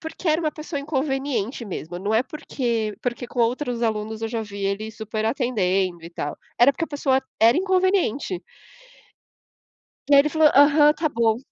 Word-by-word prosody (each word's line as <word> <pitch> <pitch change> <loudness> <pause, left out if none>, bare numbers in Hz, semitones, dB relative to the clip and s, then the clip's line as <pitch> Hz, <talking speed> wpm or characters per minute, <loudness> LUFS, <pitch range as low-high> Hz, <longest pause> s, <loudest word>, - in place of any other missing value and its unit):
porque 325 +2 -8
era 310 +2 +3
uma 310 - 0
pessoa 300 -1 -6
inconveniente 270 -5 -2
mesmo, 175 -3 -6
não 205 +3 -2
é 225 +3 +3
porque 235 -7 -3
porque 245 0 -3
com 245 - -9
outros 245 0 0
alunos 220 -1 -2
eu 225 - -2
já 225 -1 -3
vi 200 -1 -6
ele 205 +3 -2
super 220 0 -4
atendendo 195 - 0
e 170 - -9
tal, 145 -3 -5 0.2
era 255 +4 +6
porque 330 - -2
a - - -13
pessoa 270 -3 +1 0.2
era 230 +2 +6
inconveniente. 370 - +1 1.7
E - - +7
aí 280 - +9
ele 300 - +1
falou: 315 0 +4
"Aham, 295 +1 +6
tá 310 0 -1
bom". 230 -3 +1
240 Hz, 175 wpm, -23 LUFS, 215-295 Hz, 1.7 s, aí